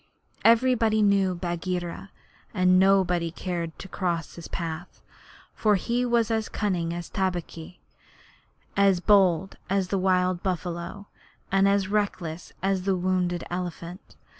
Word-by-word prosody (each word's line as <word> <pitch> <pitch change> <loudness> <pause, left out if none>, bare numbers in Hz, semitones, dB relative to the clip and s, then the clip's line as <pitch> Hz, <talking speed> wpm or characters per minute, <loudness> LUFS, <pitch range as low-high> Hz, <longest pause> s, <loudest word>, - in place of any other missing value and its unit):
Everybody 225 -2 +4
knew 195 -2 +3
Bagheera, 175 +1 -4 0.5
and 185 -1 +4
nobody 185 -3 +3
cared 170 -1 -4
to - - -9
cross 175 -4 -2
his 170 - -9
path; 170 0 -6 0.5
for 210 -2 +2
he 240 +6 0
was 235 -1 +2
as 220 -1 -1
cunning 180 -5 -1
as 175 0 -5
Tabaqui, 180 -2 -4 1.0
as 195 -2 +4
bold 190 -2 +3
as 195 -1 0
the 195 - 0
wild 185 -1 +1
buffalo, 175 +1 -4 0.5
and 195 +1 +4
as 200 -1 +2
reckless 185 -5 -2
as 195 -1 +1
the 190 +1 +1
wounded 180 -1 0
elephant. 175 +1 -6
185 Hz, 125 wpm, -26 LUFS, 175-200 Hz, 1.0 s, Everybody